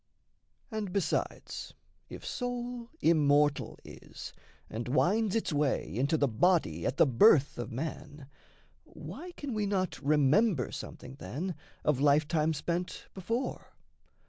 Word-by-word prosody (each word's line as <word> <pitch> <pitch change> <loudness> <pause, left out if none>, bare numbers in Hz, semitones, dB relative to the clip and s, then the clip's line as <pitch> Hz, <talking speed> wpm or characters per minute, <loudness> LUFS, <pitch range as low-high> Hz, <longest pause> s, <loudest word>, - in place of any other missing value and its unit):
And 215 -4 -3
besides, 200 0 -2 0.3
If - - -9
soul 245 -1 -4
immortal 145 -3 +3
is, - - -10 0.3
and 115 +3 -5
winds 195 - +2
its 225 -7 0
way 145 -8 0
Into 140 +7 +2
the 145 - +3
body 115 - +2
at 130 - -2
the - - +7
birth 140 - +5
of 120 -1 -4
man, 145 +2 -5 0.6
Why 360 +1 -9
can 285 -7 -5
we 210 -2 0
not 190 -3 -1
remember 150 - +3
something, 130 +2 -8
then, 175 +9 -4 0.3
Of 150 -4 +2
life 145 +1 +4
time 160 0 +1
spent 175 +4 -3
before? 230 +7 -4
155 Hz, 125 wpm, -31 LUFS, 140-205 Hz, 0.6 s, the